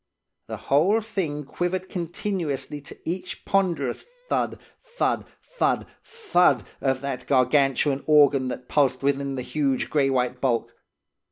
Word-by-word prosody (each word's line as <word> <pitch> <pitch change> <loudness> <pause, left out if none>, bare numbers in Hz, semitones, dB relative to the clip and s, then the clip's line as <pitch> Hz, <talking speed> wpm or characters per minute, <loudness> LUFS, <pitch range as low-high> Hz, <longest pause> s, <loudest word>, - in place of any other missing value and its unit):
The - - -5
whole 175 +11 +3
thing 190 -10 -3
quivered 180 +6 -2
continuously 170 -5 -3
to - - -12
each 180 +3 -5
ponderous 170 - 0 0.2
thud, - - 0 0.4
thud, - - 0 0.3
thud, - - +2 0.2
thud, 355 - +2 0.2
of 130 -1 0
that 140 -2 -4
gargantuan 135 +1 +2
organ 145 -3 +5
that 125 0 -6
pulsed 135 -3 +2
within 140 0 0
the 130 - -3
huge 140 -1 -1
grey 140 -3 +3
white 125 -1 0
bulk. 115 -3 0
140 Hz, 125 wpm, -25 LUFS, 135-175 Hz, 0.4 s, organ